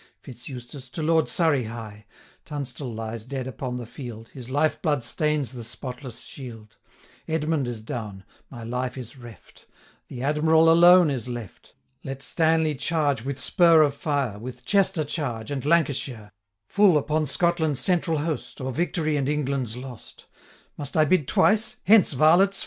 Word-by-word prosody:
Fitz 125 -2 -10
Eustace, 130 +1 -8
to 160 - -5
Lord 160 0 +2
Surrey 155 -8 +2
hie; 110 -2 -9 0.4
Tunstall 140 -3 -5
lies 110 0 -5
dead 130 +1 -5
upon 125 0 -5
the 120 - -6
field, 115 -2 -9
His 125 -2 -10
life 145 +4 +1
blood 145 -6 0
stains 150 +1 -1
the 125 -3 -8
spotless 125 +1 -5
shield: 115 -5 -10 0.5
885 - - -4
Edmund 155 -4 0
is 115 -3 -5
down; 105 -4 -6 0.3
my 120 -3 -9
life 125 +2 -3
is 125 0 -8
reft; 120 -6 -15 0.4
The 125 0 -7
Admiral 160 +3 +4
alone 175 -1 +7
is 125 -2 -3
left. 120 -5 -8 0.3
Let 135 0 -6
Stanley 160 -1 +2
charge 145 -3 0
with 135 0 -4
spur 165 +4 +5
of 145 -2 +1
fire, 140 -7 -2
With 125 +2 -9
Chester 195 -5 +2
charge, 130 -7 -4
and 135 -2 -3
Lancashire, 135 -9 0 0.3
Full 195 - +4
upon 155 +1 0
Scotland's 160 -2 +1
central 170 -3 +1
host, 155 +1 -4
890 - - -6
Or 130 - -2
victory 160 -2 0
and 140 -1 -1
England's 135 -5 -1
lost. 125 -2 -10 0.5
Must 145 +1 -4
I 155 - +5
bid 155 -3 +2
twice? 215 - +2
hence, 205 -5 +5
varlets! 175 +8 +4
140 Hz, 160 wpm, -25 LUFS, 120-155 Hz, 0.5 s, alone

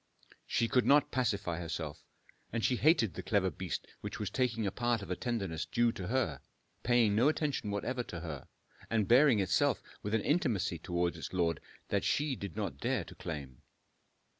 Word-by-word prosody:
She 115 - +1
could 125 +1 +2
not 145 0 +5
pacify 100 -9 0
herself, 80 -3 -5 0.5
and 115 -1 0
she 125 - +2
hated 140 - +4
the 90 - -5
clever 95 0 +1
beast 95 -2 -4 0.2
which - - -5
was 105 -3 -3
taking 115 -3 0
a 100 - 0
part 120 0 0
of 100 - -9
the 90 - 0
tenderness 95 -9 -2
due 120 +7 +2
to 95 -5 -6
her, 115 - 0 0.4
paying 120 -4 +3
no 120 +7 +5
attention 150 -8 -1
whatever 125 +5 -2
to 85 - -6
her, 75 -6 -6 0.4
and 110 -4 +1
bearing 130 0 +6
itself 95 -2 +2 0.2
with 105 +2 -1
an 110 - +2
intimacy 110 - +1
towards 85 +1 -1
its - - -6
lord 85 -3 +1 0.3
that - - +1
she 145 -2 +1
did 100 -7 -7
not - - -3
dare - - 0
to - - -12
claim. 70 -5 -7
105 Hz, 185 wpm, -33 LUFS, 90-120 Hz, 0.5 s, bearing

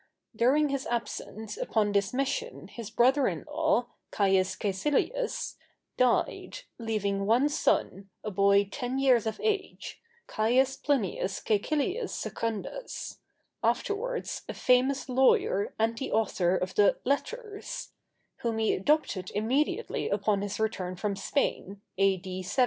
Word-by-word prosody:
During 275 +6 +3
his 275 -1 -2
absence 220 -2 -4
upon 210 -2 +1
this 200 -1 +1
mission 275 - -2
his 230 -3 -7
brother 260 +4 +4
in - - -3
law, 305 -4 +1 0.2
Caius 190 -2 +2
Cæcilius, 295 - -1 0.4
died, 255 - +1 0.2
leaving 200 -3 -1
one 245 +6 +4
son, 195 -9 0
a 215 - -3
boy 200 +1 +4
ten 250 +1 -3
years 255 -5 +4
of 220 - -3
age, 415 -3 -2 0.2
Caius 255 +5 +2
Plinius 240 - -1
Cæcilius 305 - 0
Secundus—afterwards 415 - -4
a - - -4
famous 255 +1 +2
lawyer 255 -6 +2
and 225 +1 +1
the 270 - -4
author 190 -4 +2
of 185 +1 -3
the 205 -1 +4
"Letters"—whom 405 - -4
he 220 -1 +2
adopted 195 -6 +1
immediately 270 - 0
upon 200 0 +1
his 205 +1 -4
return 190 -5 -1
from 200 +2 -2
Spain, 200 -3 -1 0.2
A.D. 190 -1 +1
70. 185 +9 -4
230 Hz, 120 wpm, -29 LUFS, 200-275 Hz, 0.4 s, brother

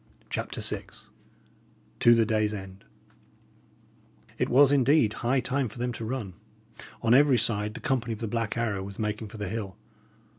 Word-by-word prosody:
CHAPTER - - -3
VI - - +1 1.1
TO 120 0 +6
THE 115 -1 +3
DAY'S 110 -1 0
END 95 -1 -10 1.5
It - - 0
was, 140 +2 +6
indeed, 140 -4 +3
high 125 +2 +1
time 130 0 -1
for 105 - -13
them 125 +1 -2
to 115 - -6
run. 110 -5 -4 0.7
On 115 0 +4
every 140 -1 +5
side 105 -1 0
the - - -7
company 120 -3 -1
of 110 - -8
the 115 - -3
Black 115 0 -2
Arrow 110 -4 -1
was 100 0 -8
making 105 0 -3
for 110 +2 -11
the 105 -1 -4
hill. 100 -2 -5
115 Hz, 170 wpm, -27 LUFS, 105-125 Hz, 1.5 s, TO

